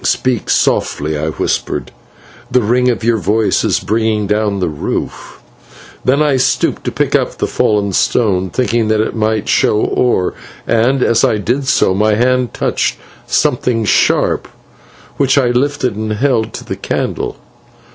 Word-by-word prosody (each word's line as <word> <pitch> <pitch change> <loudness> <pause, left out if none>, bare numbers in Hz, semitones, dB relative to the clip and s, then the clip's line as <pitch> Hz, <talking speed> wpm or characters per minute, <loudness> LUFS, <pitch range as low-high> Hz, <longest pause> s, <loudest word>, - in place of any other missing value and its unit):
"Speak 125 -4 0
softly," 75 +2 0
I 75 +1 -2
whispered, - - -2 0.6
"the 125 - +2
ring 125 +4 +2
of 120 -2 -2
your 115 0 +2
voice 105 +4 +1
is - - +1
bringing 110 -1 0
down 105 -1 0
the 90 - 0
roof." 75 -3 -5 0.6
Then 140 +4 +2
I 145 -3 +2
stooped 125 - 0
to - - -1
pick - - -1
up - - 0
the - - 0
fallen 100 -2 0
stone, 95 -3 +1
thinking 115 -1 0
that 110 0 +1
it 110 - -1
might 110 -1 -1
show 105 - +2
ore, 110 -5 +1 0.3
and, 125 +4 +2
as 115 -1 +2
I 110 - +2
did 125 +6 -2
so, 95 - +3
my 105 +2 +2
hand 125 +2 +1
touched - - -1 0.3
something 115 -3 +1
sharp, - - +2 0.7
which 135 0 +2
I 130 -3 +3
lifted 130 -1 0
and 110 0 -3
held 115 -1 0
to - - -8
the - - -5
candle. - - -3
110 Hz, 155 wpm, -15 LUFS, 105-125 Hz, 0.7 s, so